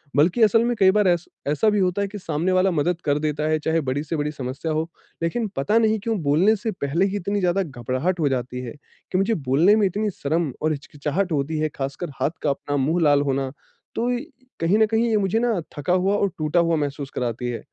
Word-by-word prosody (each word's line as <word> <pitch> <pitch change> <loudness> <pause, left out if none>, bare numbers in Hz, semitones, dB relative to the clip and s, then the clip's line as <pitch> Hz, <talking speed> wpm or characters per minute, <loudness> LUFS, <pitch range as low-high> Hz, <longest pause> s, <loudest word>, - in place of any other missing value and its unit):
बल्कि 170 - +3
असल 225 +1 +5
में 240 0 0
कई 190 -1 +6
बार 210 0 +3
ऐस 175 -1 +2 0.2
ऐसा 150 +10 +2
भी 210 -1 +1
होता 185 +1 +1
है 200 - 0
कि 205 +1 -8
सामने 165 -1 -1
वाला 185 +1 +3
मदद 170 +2 0
कर 145 -1 +2
देता 150 0 -1
है 155 0 +2
चाहे 160 +2 0
बड़ी 140 +3 -1
से 165 - -3
बड़ी 150 0 -1
समस्या 135 +3 -4
हो। 160 +2 -1 0.3
लेकिन 220 +7 0
पता 140 +11 +1
नहीं 220 -1 +2
क्यों 225 -1 0
बोलने 165 +10 +4
से 220 +2 -3
पहले 150 +7 +1
ही 200 0 -2
इतनी 200 +2 -1
ज़्यादा 185 +1 +1
घबराहट 135 +5 -2
हो 150 -3 +2
जाती 125 -1 -3
है 125 -2 -6 0.4
कि 185 - +1
मुझे 195 +4 +2
बोलने 165 +11 +5
में 215 -2 +3
इतनी 210 +3 -1
शर्म 160 -2 -1
और 155 - +1
हिचकिचाहट 150 +5 -3
होती 150 +1 -1
है 155 0 0
ख़ासकर 140 +6 -4
हाथ - - +2
काँपना, 145 0 -1
मुँह 155 +6 +1
लाल 145 -2 +4
होना 135 -1 -1 0.4
तो 240 +2 0
इ 245 +1 -2 0.4
कहीं 170 +5 +2
न 220 - +6
कहीं 225 +2 +1
ये 220 - +3
मुझे 200 +2 +1
ना 230 -5 +1 0.2
थका 145 +5 0
हुआ 190 +2 +2
और 200 - +1
टूटा 155 +2 +1
हुआ 170 -1 +2
महसूस 145 -1 -3
कराती 120 0 -2
है। 120 - -3
165 Hz, 235 wpm, -23 LUFS, 145-200 Hz, 0.4 s, कई